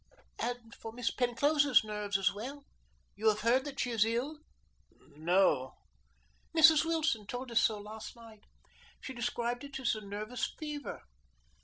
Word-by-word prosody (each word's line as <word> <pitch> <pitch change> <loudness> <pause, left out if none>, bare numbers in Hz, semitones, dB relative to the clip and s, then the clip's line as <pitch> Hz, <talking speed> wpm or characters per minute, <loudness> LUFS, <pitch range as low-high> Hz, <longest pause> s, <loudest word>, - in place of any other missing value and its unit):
"And 240 -1 -4
for 225 - -8
Miss 235 0 -1
Penclosa's 285 +3 +3
nerves 210 -2 -2
as 195 -1 +2
well. 270 +7 -7 0.5
You 215 +2 -1
have 215 0 0
heard 245 +5 +3
that 280 -2 -6
she 250 - 0
is 225 -3 +4
ill?" 245 +7 -1 0.6
"No." 155 -3 +1 0.8
"Mrs. 320 -1 +8
Wilson 315 -10 0
told 245 +2 -5
us 230 - +4
so 215 - +2
last 215 +3 -8
night. 225 -3 -14 0.6
She 265 - -7
described 240 0 -2
it 280 -1 -6
as 255 - +1
a 215 - -5
nervous 210 +4 -4
fever. 300 -2 -6
235 Hz, 150 wpm, -32 LUFS, 215-270 Hz, 0.8 s, Mrs